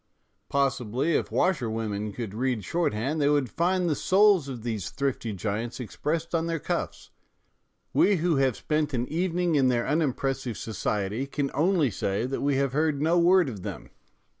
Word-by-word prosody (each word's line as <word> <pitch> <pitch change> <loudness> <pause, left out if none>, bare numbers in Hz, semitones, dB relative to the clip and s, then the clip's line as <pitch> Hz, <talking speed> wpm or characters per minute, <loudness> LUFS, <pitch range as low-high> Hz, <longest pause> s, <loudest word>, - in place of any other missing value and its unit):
Possibly 135 +1 0
if - - -1
washerwomen 110 - -1
could 110 -2 -5
read 120 -1 -1
shorthand 150 -2 -1
they 145 - +3
would 145 -6 +1
find 180 - +1
the 160 - +2
souls 195 -2 +4
of 120 -4 -7
these 110 -6 -3
thrifty 135 -5 -2
giants 110 +5 -3
expressed 155 +7 -3
on 165 0 +1
their 165 0 -1
cuffs; - - -4 0.8
we 205 - +4
who 170 -2 +1
have 135 -3 +2
spent 150 -2 -1
an 120 +1 -1
evening 175 +1 0
in 135 -3 +4
their 120 -2 +1
unimpressive 135 -5 -1
society 105 +3 -2
can 140 0 -2
only 165 - +2
say 100 +3 -1
that 135 +1 -3
we 140 0 +1
have 135 -1 0
heard 150 -1 +1
no 165 +4 +3
word 175 0 +5
of 105 -7 -6
them. - - -7
140 Hz, 165 wpm, -27 LUFS, 120-165 Hz, 0.8 s, word